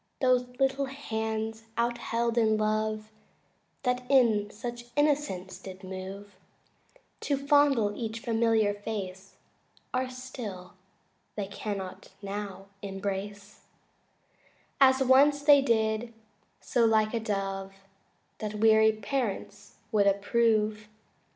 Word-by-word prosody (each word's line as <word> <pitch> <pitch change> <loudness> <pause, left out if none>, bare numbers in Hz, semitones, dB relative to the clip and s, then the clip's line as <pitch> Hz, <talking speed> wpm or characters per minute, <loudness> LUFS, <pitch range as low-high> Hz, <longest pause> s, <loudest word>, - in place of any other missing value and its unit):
Those 250 -1 +3
little 270 +1 +2
hands 220 -4 -4
out 235 0 0
held 235 0 -1
in 220 -2 +3
love, 215 0 -1 0.7
That 250 0 -1
in 225 -7 +4
such 240 +2 -7
innocence 290 -11 0
did 190 0 -10
move 190 +1 -8 0.8
To 280 - 0
fondle 275 -7 +3
each 225 -1 -4
familiar 225 -3 +2
face 195 -2 -6 0.6
Are 255 0 0
still 245 -8 -8 0.6
they 205 - -2
cannot 200 -1 -6
now 200 -1 -6 0.2
embrace 200 +1 -5 1.1
As 265 -1 +6
once 280 +3 +5
they 285 -1 +7
did 220 -2 +1 0.5
so 240 - +1
like 220 -1 +3
a 230 - 0
dove 195 -2 -3 0.6
That 215 -1 -4
weary 220 0 +5
parents 215 -3 -4 0.2
would 205 -3 +3
approve. 215 +1 +2
220 Hz, 105 wpm, -29 LUFS, 205-250 Hz, 1.1 s, they